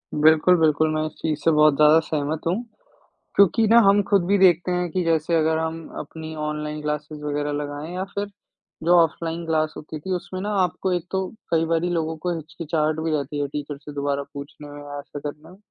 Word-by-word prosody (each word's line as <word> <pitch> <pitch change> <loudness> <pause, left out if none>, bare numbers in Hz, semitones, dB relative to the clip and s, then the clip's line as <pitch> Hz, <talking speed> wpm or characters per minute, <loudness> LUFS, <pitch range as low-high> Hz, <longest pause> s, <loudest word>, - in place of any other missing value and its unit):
बिल्कुल, 155 +4 +5
बिल्कुल, 155 0 +3
मैं 155 0 0
इस 155 - -4
चीज़ 155 -2 -2
से 165 - +4
बहुत 150 -1 +5
ज़्यादा 150 +2 +6
सहमत 150 0 -2
हूँ। 170 - +2 0.8
क्योंकि 205 +3 +4
ना, 230 +2 +7
हम 200 -1 +5
खुद 195 -4 +3
भी 200 +1 +3
देखते 180 -2 +4
हैं 180 0 0
कि 185 +1 0
जैसे 165 0 +1
अगर 160 0 +2
हम 160 0 -3
अपनी 160 +1 -8
ऑनलाइन 150 0 -4
क्लासेस 150 0 -4
वगैरह 145 0 -2
लगाएँ 145 +3 -5
या 185 - -2
फिर 205 0 -2 0.6
जो 175 +2 +5
ऑफलाइन 165 +1 -3
क्लास 155 -1 0
होती 155 0 -7
थी, 190 +6 -6
उसमें 185 +1 -6
ना 205 - -3
आपको 180 +1 -2
एक 175 -1 -2
तो 190 0 -1 0.2
कई 165 -1 +3
बारी 165 +1 0
लोगों 160 -2 -1
को 175 +2 -2
हिचकिचाहट 160 -1 -2
भी 160 0 -1
रहती 145 -1 -2
है 145 - -1
टीचर 145 0 -5
से 145 +1 -11
दोबारा 140 0 -1
पूछने 145 +1 -9
में 145 0 -9
या 145 0 -7
ऐसा 145 0 -8
करने 150 +2 -13
में। 185 - -15
160 Hz, 210 wpm, -23 LUFS, 150-170 Hz, 0.8 s, ना